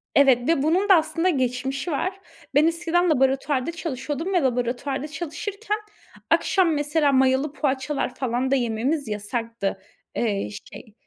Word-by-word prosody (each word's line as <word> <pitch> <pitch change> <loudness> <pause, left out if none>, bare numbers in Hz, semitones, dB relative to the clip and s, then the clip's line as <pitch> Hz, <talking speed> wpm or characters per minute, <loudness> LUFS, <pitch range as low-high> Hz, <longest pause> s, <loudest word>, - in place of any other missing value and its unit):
Evet 260 -3 +5
ve 330 -5 +3
bunun 365 +7 +2
da 385 - +9
aslında 325 +2 +1
geçmişi 265 +1 -1
var. 370 +6 -2 0.4
Ben 305 +2 +6
eskiden 350 +1 +1
laboratuvarda 270 +1 +1
çalışıyordum 325 +1 -4
ve 355 - +3
laboratuvarda 260 +2 -1
çalışırken 400 +7 -4 0.5
akşam, 365 -4 +3
mesela, 295 0 +2
mayalı 265 +2 +2
poğaçalar 270 -2 -1
falan 255 +1 -1
da - - +5
yememiz 250 +4 -1
yasaktı. 210 -1 -3 0.3
Eee, 205 - -1 0.2
şey, 215 - -12
280 Hz, 130 wpm, -24 LUFS, 255-330 Hz, 0.5 s, da